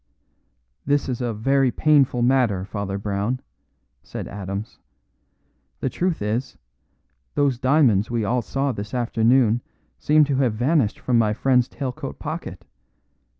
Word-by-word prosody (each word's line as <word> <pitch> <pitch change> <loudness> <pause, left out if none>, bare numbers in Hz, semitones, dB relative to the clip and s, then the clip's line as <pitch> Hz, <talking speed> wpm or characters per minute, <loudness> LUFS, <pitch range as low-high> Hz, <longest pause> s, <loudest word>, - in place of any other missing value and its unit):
"This 145 +1 +1
is 125 -1 -3
a 120 -1 -1
very 135 +5 +2
painful 135 -3 +3
matter, 120 -7 +2
Father 100 -1 -4
Brown," 100 +5 -2 0.6
said - - -7
Adams. 100 +2 -6 1.0
"The 130 - -2
truth 175 - -1
is, 115 +5 -2 0.8
those 140 -4 +1
diamonds 130 -7 +3
we 115 -2 -1
all 120 +4 +1
saw 135 +6 -1
this 105 +1 -6
afternoon 120 0 +2 0.4
seem 150 +1 +4
to 140 -2 0
have 125 -5 +1
vanished 125 -1 +1
from 120 -2 +1
my 105 -2 +2
friend's 125 +1 +2
tail 135 -1 -4
coat - - -7
pocket. - - -6
120 Hz, 135 wpm, -23 LUFS, 105-135 Hz, 1.0 s, seem